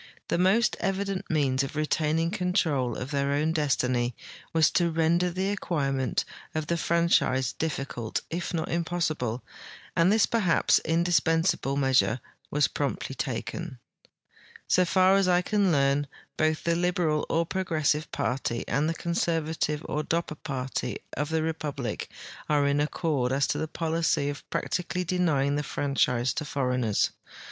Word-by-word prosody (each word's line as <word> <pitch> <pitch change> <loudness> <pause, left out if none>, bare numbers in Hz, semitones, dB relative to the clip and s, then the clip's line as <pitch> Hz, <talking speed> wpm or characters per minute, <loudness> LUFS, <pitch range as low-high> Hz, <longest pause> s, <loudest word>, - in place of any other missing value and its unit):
The - - +1
most 205 +5 +3
evident 195 -1 -2
means 140 -4 +2
of 135 +2 -4
retaining 155 +2 +1
control 175 - 0
of 130 +3 -5
their 140 -1 0
own 150 +3 +1
destiny 125 -6 0 0.4
was 160 -2 +4
to 175 -2 +2
render 165 +2 +2
the 190 +3 -1
acquirement 140 -9 -1 0.3
of 155 -1 -1
the 170 - 0
franchise 165 -6 +2
difficult 135 -7 -3
if 175 +2 -3
not 165 -3 -2
impossible, 160 -9 -1 0.5
and 170 +3 +4
this 220 0 +5
perhaps 205 -8 +3
indispensable 165 -3 +1
measure 130 -3 +3 0.3
was 150 0 +2
promptly 140 -1 -3
taken. 135 +4 -4 0.9
So 180 - +4
far 185 +2 +4
as 195 -1 +2
I 180 0 +3
can 200 -2 +2
learn, 140 -1 +2 0.3
both 155 0 +1
the 170 0 +2
liberal 175 -3 +1
or 165 +1 +1
progressive 155 -4 0
party 125 -2 -2
and 150 +3 +1
the 165 - -2
conservative 160 -3 -1
or 150 - -1
Dopper 165 +1 -1
party 130 -2 -3 0.2
of 150 +2 -2
the 160 -1 0
republic 150 -7 -3 0.4
are 145 -1 +3
in 140 0 +2
accord 150 -4 0
as 135 +1 +2
to - - 0
the 160 - -2
polic}'' 160 -3 0
of 145 - -11
practically 180 0 -2
denying 155 -6 +1
the - - 0
franchise 130 -4 0
to 155 - -3
foreigners. 125 -7 0
155 Hz, 145 wpm, -27 LUFS, 140-170 Hz, 0.9 s, this